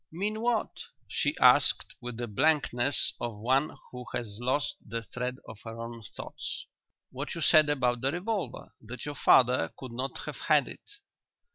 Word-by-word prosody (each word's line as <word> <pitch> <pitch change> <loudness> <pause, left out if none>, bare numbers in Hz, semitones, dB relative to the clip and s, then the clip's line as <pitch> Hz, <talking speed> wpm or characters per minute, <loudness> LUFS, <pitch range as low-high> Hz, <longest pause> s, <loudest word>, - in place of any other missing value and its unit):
"Mean 210 +6 -2
what?" 235 -2 0 0.3
she - - 0
asked, - - +5
with 120 -1 -6
the 120 - -2
blankness 135 +1 +2
of 120 -3 -3
one 130 +7 +1
who 125 0 -8
has 105 -3 -3
lost 130 0 0
the 115 +1 -5
thread 125 +2 -4
of 110 - -10
her 115 0 -8
own 115 0 -7
thoughts. 100 - -6 0.5
"What 140 +5 -5
you 170 - -5
said 155 0 +6
about 125 -4 +1
the 135 - +1
revolver 195 +4 -4
that 120 +3 -7
your 145 - -4
father 125 - +4
could 130 -2 -8
not 130 +3 -3
have - - -6
had - - +3
it?" - - -11
125 Hz, 165 wpm, -29 LUFS, 115-150 Hz, 0.5 s, said